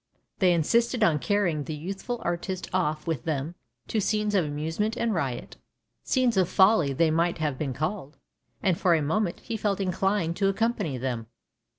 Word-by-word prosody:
They 185 -3 +5
insisted 235 - +2
on 155 -3 +3
carrying 175 -8 0
the 155 - -4
youthful 195 +9 -5
artist 175 +2 -3
off 155 -5 0
with 160 -8 -2
them 155 +1 -2 0.3
to 220 - 0
scenes 210 +1 0
of 190 -3 +3
amusement 160 +10 -2
and 230 -2 0
riot 135 -9 -3 0.2
— - - -53
scenes 250 -5 +1
of 185 -2 +3
folly 190 -7 +4
they 160 +4 +2
might 170 +2 +1
have 150 -4 -2
been 135 -5 -2
called 155 - -3 0.2
— 120 -2 -36
and 180 -3 +2
for 175 -2 +4
a 160 - +1
moment 175 +4 -1
he 230 -2 -4
felt 205 -2 0
inclined 190 -2 0
to 195 - +2
accompany 200 - -1
them. 120 -3 -3
175 Hz, 185 wpm, -27 LUFS, 150-205 Hz, 0.3 s, They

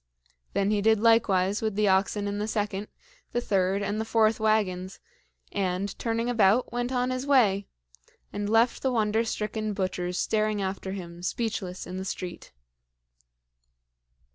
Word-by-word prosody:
Then 200 +1 +1
he 210 -1 +1
did 220 0 +4
likewise 205 -4 +3
with 220 -2 -1
the 210 0 +2
oxen 200 +2 +2
in 205 0 -3
the 210 - -2
second, 210 -2 -2 0.5
the 240 - +1
third, 195 -3 +1
and 205 +2 -1
the - - 0
fourth 220 -1 +2
wagons, 195 -4 0 0.5
and, 190 0 -1
turning 230 0 -1
about, 230 0 +3
went 245 +1 -1
on 250 0 0
his 255 +2 -3
way, 205 -8 +3 0.7
and 205 0 -2
left 225 +2 +3
the 265 - +1
wonder 220 -1 +1
stricken 215 -1 -3
butchers 185 -2 -2
staring 215 -1 0
after 190 0 -3
him, 175 -3 -8
speechless, 190 -2 -3
in 180 +1 -6
the 190 - -3
street. 180 -2 -6
210 Hz, 150 wpm, -27 LUFS, 190-225 Hz, 0.7 s, did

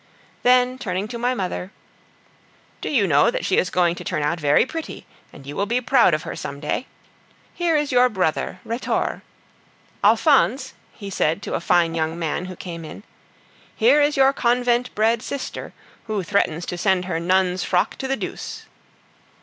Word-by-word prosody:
Then, 250 +1 +3
turning 190 -1 -3
to 235 - -6
my 250 +2 0
mother, 185 -2 -4 1.1
"Do - - -3
you 240 -9 +2
know 155 +6 +4
that - - -3
she 190 - +1
is - - 0
going 175 -2 +2
to - - -8
turn 150 - -2
out 165 +3 0
very 145 +5 +3
pretty, 325 +4 -7 0.3
and 135 - -14
you 145 +1 -7
will 200 - -1
be 240 +4 +1
proud 245 - +4
of 155 - -5
her - - -6
some 140 0 -6
day? 150 - -3 0.7
Here 345 -2 0
is 295 -1 -1
your 250 0 +5
brother, 180 -3 -1
Rhetore. 230 +2 -2 0.8
Alphonse," 265 - +3 0.2
he 200 -2 -9
said 160 -3 0
to - - -5
a - - -1
fine 170 -1 +2
young 160 0 -2
man 170 +1 -2
who 185 0 -7
came 170 -2 -7
in, 160 +5 -10 0.7
"here 255 +6 +4
is 290 0 +2
your 270 0 +5
convent 245 0 +1
bred 220 +2 +2
sister, 270 +1 -6 0.3
who 215 -3 -2
threatens 175 -3 0
to 175 - -5
send 190 -1 +1
her 170 -3 -2
nun's 185 +1 +1
frock 180 -1 0
to 265 - -4
the 270 0 -1
deuce." - - -6
200 Hz, 180 wpm, -22 LUFS, 170-250 Hz, 1.1 s, your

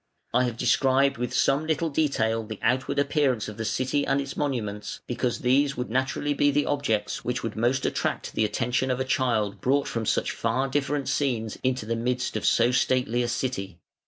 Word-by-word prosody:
I 125 - +4
have 120 -2 -3
described 135 +1 +3
with 125 - -2
some 140 +3 +2
little 160 0 0
detail 115 -7 +1
the 110 -1 -7
outward 130 +4 +1
appearance 140 -5 +1
of 105 -1 -8
the 115 - -3
city 130 +5 0
and 135 0 +1
its 140 0 -4
monuments, 110 -8 -3
because 120 0 -2
these 140 +3 +2
would 125 -2 -3
naturally 130 +3 0
be 145 0 +3
the 145 +1 +2
objects 140 -7 -1
which 125 +1 -2
would 115 - -3
most 120 +4 +1
attract - - -2
the - - +1
attention 125 +4 0
of 125 0 0
a 130 - 0
child 110 -7 0
brought 140 +2 +2
from 115 -2 -3
such - - +1
far 130 +4 0
different 140 0 -1
scenes 115 -6 -1
into 130 -3 0
the 115 +1 -1
midst 125 +2 -1
of - - 0
so 120 +1 +4
stately 125 -1 +1
a 120 - 0
city. 105 -7 -3
125 Hz, 195 wpm, -26 LUFS, 115-140 Hz, -, I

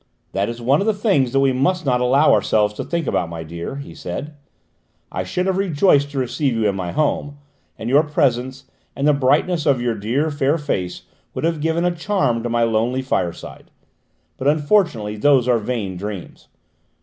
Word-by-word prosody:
"That 100 +2 -1
is 120 0 -6
one 135 +7 +2
of 200 - -1
the 220 - +2
things 195 - +1
that 135 +1 +2
we 135 -1 +3
must 155 +7 0
not 125 -2 +1
allow 135 +5 +4
ourselves 105 -1 +2
to - - -5
think 170 -2 -2
about, 90 -8 -1
my 85 -1 -6
dear," 85 +8 -6
he 140 0 -8
said. 150 +2 -6 0.8
"I - - -3
should 180 - -2
have 190 0 0
rejoiced 150 -5 +3
to 145 - -7
receive 130 +1 0
you 110 -2 +1
in 100 - +1
my 90 -2 -3
home, 145 -1 -1 0.4
and 110 - -6
your 140 +4 +5
presence, 130 -3 0 0.3
and 140 +1 0
the 150 - +5
brightness 145 +5 +1
of 135 -3 +3
your 120 -1 0
dear 120 +9 -1
fair 145 +2 +1
face 95 - -3 0.3
would - - -4
have 165 -2 0
given 165 +2 0
a 175 -1 +1
charm 170 - 0
to 120 - -3
my 120 0 +1
lonely 115 +3 0
fireside; 90 -9 -3 0.7
but 130 - -2
unfortunately 145 - +1
those 130 +1 +3
are 120 -2 +3
vain 105 -5 -3
dreams. 100 -1 -7
135 Hz, 195 wpm, -20 LUFS, 115-150 Hz, 0.8 s, your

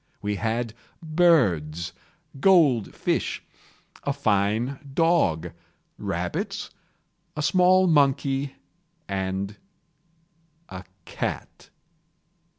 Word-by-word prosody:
We 105 0 -2
had 115 +1 -2 0.3
birds, 105 - +2 0.5
gold 150 - +4
fish, - - -1 0.6
a 140 - 0
fine 115 0 0 0.2
dog, 90 - +2 0.5
rabbits, - - -3 0.7
a 150 - -1
small 185 +3 +4
monkey, 140 -3 +2 0.5
and 95 +1 -3 1.1
a 95 0 -8 0.2
cat. - - -5
120 Hz, 70 wpm, -25 LUFS, 95-155 Hz, 1.1 s, gold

